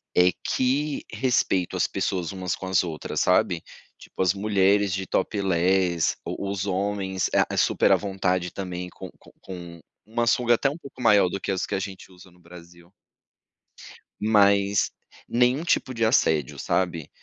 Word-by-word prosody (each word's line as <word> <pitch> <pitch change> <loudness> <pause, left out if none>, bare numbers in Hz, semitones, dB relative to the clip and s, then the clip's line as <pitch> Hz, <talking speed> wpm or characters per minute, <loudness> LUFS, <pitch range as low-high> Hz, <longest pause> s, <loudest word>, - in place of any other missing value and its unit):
é 90 0 +5
que 140 +3 0
respeito 110 -6 0
as - - +2
pessoas 90 -1 -2
umas 95 -2 -3
com 95 - -7
as 95 -2 +3
outras, 80 -3 -4
sabe. 90 -2 +2 0.4
Tipo, - - -8
as 90 -1 +3
mulheres 100 -1 +2
de 95 +1 -2
topless, 95 -3 +1
os 100 -1 -3
homens, 95 0 -1
eh, - - +1
super - - +3
à - - +7
vontade 95 -3 -1
também 90 -2 -5
co - - -10
com - - -19
com 85 -3 -9 0.2
uma 115 +2 -1
sunga 120 0 +3
até 135 - +1
um 150 - -6
pouco 140 -5 -12
maior 105 -5 +5
do 100 - -4
que - - -2
as 95 - -1
que - - -3
a - - -1
gente 95 -1 -8
usa 90 0 -16
no 90 - -23
Brasil. 85 +1 -15 1.3
Mas 100 -2 +3 0.4
nenhum 125 +6 +2
tipo 130 -6 0
de 115 -2 0
assédio, 80 - +2
sabe. 85 -5 -1
95 Hz, 160 wpm, -25 LUFS, 90-105 Hz, 1.3 s, à